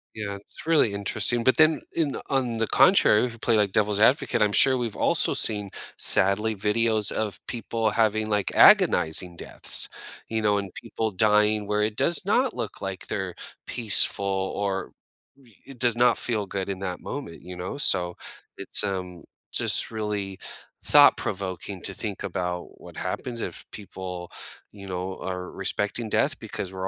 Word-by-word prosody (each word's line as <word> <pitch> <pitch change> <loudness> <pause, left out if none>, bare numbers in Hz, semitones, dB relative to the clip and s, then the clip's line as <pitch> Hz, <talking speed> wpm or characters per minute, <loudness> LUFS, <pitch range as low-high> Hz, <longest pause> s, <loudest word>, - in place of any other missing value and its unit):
Yeah. 100 -2 -5
It's 100 - -12
really 155 -11 +2
interesting, 110 +4 0
but 130 - +2
then 155 0 +4
in 155 -5 -1
on 125 -4 -1
the 115 - -1
contrary, 180 - +4
if 120 - -6
we 115 - -13
play, 115 0 0
like, 100 -2 +1
devil's 105 0 0
advocate, 120 0 +2
I'm 105 -1 +3
sure 130 +4 +4
we've 120 -4 -4
also - - +1
seen, 105 -2 +1 0.3
sadly, 105 +3 +5
videos 110 +1 +1
of 110 -2 -3
people 115 -1 -2
having, 110 -1 +1
like, 105 -2 -1
agonizing 85 +2 +4
deaths, - - 0 0.4
you 110 0 -2
know, 105 -1 +2
and 100 -2 -5
people 110 -1 -4
dying 105 +1 +2
where 105 0 0
it 105 0 -2
does 170 - +2
not 245 +5 +1
look 110 - -6
like 95 -1 -6
they're 95 -3 -4 0.3
peaceful 105 -3 +3
or 95 0 -3 0.5
re 120 -7 -23
it 135 -2 -13
does 120 -2 +3
not 120 +1 +3
feel 110 -4 -2
good 95 0 -4
in 95 -1 -4
that 90 -2 -5
moment, 135 -13 -8
you 90 +1 -10
know, 90 +10 -6
so, 90 -10 +2 0.4
it's, - - 0
um, 90 -3 -5 0.3
just - - +3
really 105 -3 -4 0.4
thought-provoking 95 0 +2
to 95 - -4
think 100 0 -6
about 90 -1 -5
what - - -13
happens, 120 -2 -4
if - - -6
people, 90 -3 -8 0.4
you 100 -2 -12
know, 95 +1 -5
are 90 -1 -5
respecting 105 +3 -3
death - - 0
because 95 - -6
we're 95 0 -5
105 Hz, 165 wpm, -25 LUFS, 95-115 Hz, 0.5 s, sadly